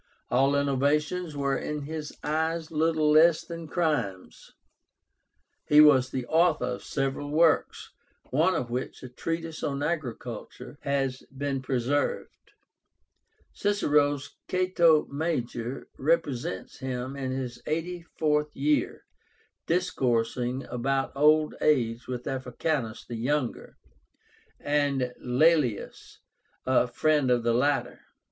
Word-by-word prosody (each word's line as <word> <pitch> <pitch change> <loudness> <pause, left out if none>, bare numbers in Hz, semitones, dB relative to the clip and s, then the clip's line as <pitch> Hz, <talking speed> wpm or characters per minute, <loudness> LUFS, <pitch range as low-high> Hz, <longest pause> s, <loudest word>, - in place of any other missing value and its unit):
All 135 +3 +3
innovations 145 +4 0
were 140 -1 0
in 150 +1 -4
his 155 0 -5
eyes 160 +2 -1
little 155 -1 +2
less 160 +1 +5
than 165 -1 -7
crimes. 150 - -2 1.2
He 150 - +6
was 135 -4 +7
the 130 -2 -3
author 160 -2 +2
of 125 0 -4
several 135 +1 -2
works, 160 +1 +2 0.4
one 165 +7 +3
of 120 -6 -3
which, 125 +2 -4
a 130 - -7
treatise 165 +5 -4
on 140 0 -2
agriculture, 125 -3 -5
has 135 -2 -1
been 135 0 -3
preserved. 130 +2 -2 1.0
Cicero's 145 -8 +1 0.2
"Cato 175 -4 +3
Major" 135 -5 -3
represents 140 - -1
him 130 0 -4
in 135 -2 -3
his 130 -2 -4
eighty 170 +3 -2 0.2
fourth 150 -1 +1
year 150 +2 0 0.6
discoursing 125 -6 0
about 135 +2 -1
old 150 +2 +4
age 120 -5 +1
with 125 -1 -4
Africánus 130 -2 -3
the 120 - -6
younger, 130 +2 -2 0.8
and 140 -4 0
Laelius, 130 -3 +1 0.5
a 130 -1 +3
friend 150 +1 +1
of 120 -1 +2
the 120 0 +2
latter. 140 +4 0
140 Hz, 110 wpm, -27 LUFS, 125-155 Hz, 1.2 s, was